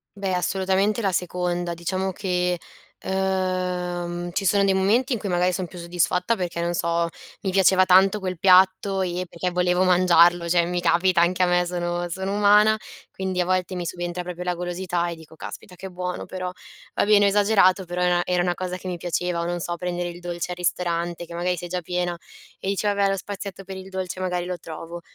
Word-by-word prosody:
Beh, 195 -2 -2
assolutamente 190 +4 +1
la 195 -2 +1
seconda. 175 -1 -2
Diciamo 185 +3 -2
che, 180 -2 -1 0.4
ehm, 180 -2 -2
ci 195 - -1
sono 200 +2 +4
dei 195 -1 +3
momenti 225 +8 +2
in 230 - -2
cui 200 - -4
magari 180 +1 +2
son 185 -1 -2
più 180 - -12
soddisfatta, 180 +4 0
perché, 175 -3 -4
non 170 0 -1
so, 170 0 0 0.3
mi 190 - -1
piaceva 190 0 +5
tanto 190 +3 +5
quel 185 -3 -4
piatto 190 +1 +4
e 180 0 -2
perché 180 +1 -3
volevo 180 +1 +2
mangiarlo, 175 -1 +4
cioè 170 -1 +3
mi 175 0 -2
capita 175 0 +3
anche 180 +1 +2
a - - +5
me, 180 0 +2
sono 175 0 -2
sono 190 +3 -3
umana, 210 +1 +5 0.4
quindi 190 -1 -2
a - - 0
volte 185 0 0
mi 175 -1 -3
subentra 175 +1 -4
proprio 180 0 -6
la 180 -1 -1
golosità 175 0 -2
e 170 - -5
dico: 160 0 -15
“Caspita, 180 +3 -9
che 190 +2 -8
buono 180 0 -4
però". 185 -1 -5 0.4
Va - - +2
bene, 205 -1 +5
ho - - +5
esagerato, 200 -2 +4
però 175 +1 -4
e 175 -1 +3
era 180 -1 +1
una 175 0 0
cosa 185 0 -4
che 185 - -9
mi 180 -1 -3
piaceva, 175 0 -2
o, - - -2
non 175 0 -2
so, 175 +1 -3
prendere 175 0 -3
il 175 - -9
dolce 175 0 -4
al 175 - -5
ristorante, 175 -1 -1
che 170 - -8
magari 180 +1 -1
sei 175 - -6
già 180 0 -2
piena 175 0 -2 0.4
e 190 - -3
dici: 200 +1 0
“Vabbè, 200 -1 +2
lo 195 - 0
spazietto 195 0 -7
per 190 0 -8
il 190 0 -9
dolce 185 -1 -4
magari 180 -1 -1
lo 180 0 -4
trovo”. 165 +1 -8
180 Hz, 210 wpm, -24 LUFS, 175-190 Hz, 0.4 s, piaceva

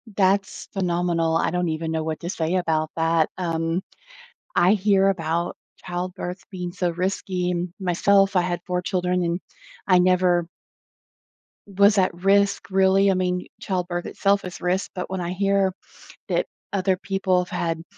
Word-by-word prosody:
That's 195 0 +1
phenomenal. 175 -3 0
I - - +1
don't 180 -1 0
even 160 +1 -2
know 160 -1 -1
what 160 -1 -3
to 170 - -4
say 165 -1 -1
about 160 -3 0
that. 165 -1 +2
Um, 165 -1 -1 0.7
I 175 +3 +5
hear 195 -1 +3
about 170 -2 -1 0.3
childbirth 180 0 -4
being 180 -2 -5
so 180 -1 -1
risky. 180 0 -1 0.3
Myself, 195 +2 +3
I 180 - +5
had 175 -1 -2
4 180 -1 0
children 180 -1 0
and 170 +1 -1 0.5
I 185 -2 +5
never 180 -1 +3 1.3
was 200 +1 +6
at 185 -2 +3
risk, 200 -1 +3
really. 195 +1 +4
I 190 - +3
mean, 180 0 -1
childbirth 175 -2 -2
itself 200 -1 +1
is 180 - -8
risk, 180 +2 -1
but 180 -1 -5
when 190 - -3
I 175 0 -3
hear 195 0 +1 0.5
that - - 0 0.3
other 190 -1 +1
people 195 -1 0
have - - -17
had 165 -1 -2
180 Hz, 155 wpm, -23 LUFS, 175-190 Hz, 1.3 s, was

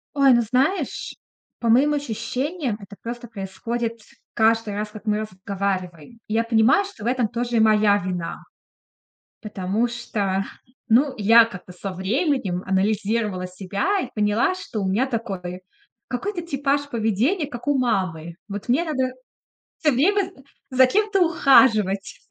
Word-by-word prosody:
Ой, 275 -2 +6
ну 240 - +4
знаешь, 270 - -1 0.4
по 235 - -1
моим 275 +6 +5
ощущениям, 270 - -3
это 200 0 -12
просто 240 +1 -6
происходит 230 +3 -4 0.4
каждый 225 -2 +2
раз, 210 +1 -3
как 215 0 -11
мы 210 0 +1
разговариваем. 190 -1 -4
Я 225 +2 +1
понимаю, 230 - +3
что 315 - -11
в - - -2
этом 245 -2 +1
тоже 240 +1 -2
и - - +4
моя 215 -2 +4
вина. 180 -3 -4 1.0
Потому 210 +2 -1
что 200 -5 -2 0.4
ну 260 +4 +4
я 225 +2 +7
как-то 180 -4 -10
со 195 +2 -6
временем 195 - -1
анализировала 205 0 0
себя 200 - -1
и - - -5
поняла, 210 - +2
что 230 -11 -6
у 195 - -1
меня 215 +8 +2
такой 190 -7 -4 0.5
какой-то 355 +9 -3
типаж 285 -2 -1
поведения, 235 - 0
как 245 0 -9
у 285 -2 +3
мамы. 175 -9 -1
Вот 205 +1 -6
мне 275 +8 +3
надо 260 -5 -1 0.6
всё 300 - +2
время, 390 +10 +3
э, 370 -7 -15 0.3
за 260 -1 +5
кем-то 410 +6 +1
ухаживать, 230 - +4
230 Hz, 145 wpm, -23 LUFS, 200-265 Hz, 1.0 s, я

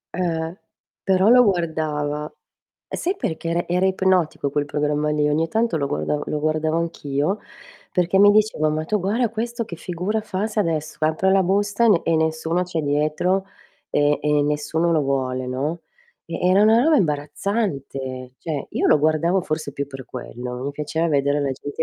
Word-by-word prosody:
Eh, 170 -1 -2 0.5
però 190 +1 +3
la 250 +1 +8
guardava. 155 -6 -1 0.6
E - - -4
sai 370 +3 -1
perché 165 - -3
era 170 +1 -1
era 180 +2 +1
ipnotico 190 -6 +1
quel 145 +1 0
programma 150 +1 -1
lì, 150 -1 +1
ogni 160 +2 +1
tanto 225 -2 0
lo 140 - 0
guardav 145 +1 -2
lo 150 - -2
guardavo 155 +1 0
anch'io, 165 +3 -2 0.5
perché 180 +1 +2
mi 205 +1 +8
dicevo: 205 -8 +2
"Ma 155 +1 -2
tu 210 +4 +1
guarda 220 +6 +1
questo 230 +2 -3
che 170 - -7
figura 185 +6 -3
fa 205 -1 -2
se 215 -1 -1
adesso 160 -4 -2
apre 160 +5 +2
la 190 0 +4
busta 205 +4 +1
e - - +5
ne 190 -6 +4
e 165 - +2
nessuno 160 +2 0
c'è 175 -2 -3
dietro, 155 +6 0 0.5
e 145 0 +2
e 150 0 +2
nessuno 150 +3 0
lo 155 - +2
vuole," 130 -2 -1
no, 140 +7 -2 0.4
e 165 - -5
era 195 +3 +5
'na 220 +2 +5
roba 320 -1 +5
imbarazzante. 145 - -2
Cioè, 155 -4 -4
io - - 0
lo - - +5
guardavo 160 +5 +2
forse 155 -4 -3
più 140 0 -3
per 135 -2 -9
quello, 125 +1 -6
mi 140 - -2
piaceva 150 +3 -2
vedere 140 -1 +2
la 140 - 0
gente 145 +2 -4
160 Hz, 180 wpm, -22 LUFS, 145-190 Hz, 0.6 s, la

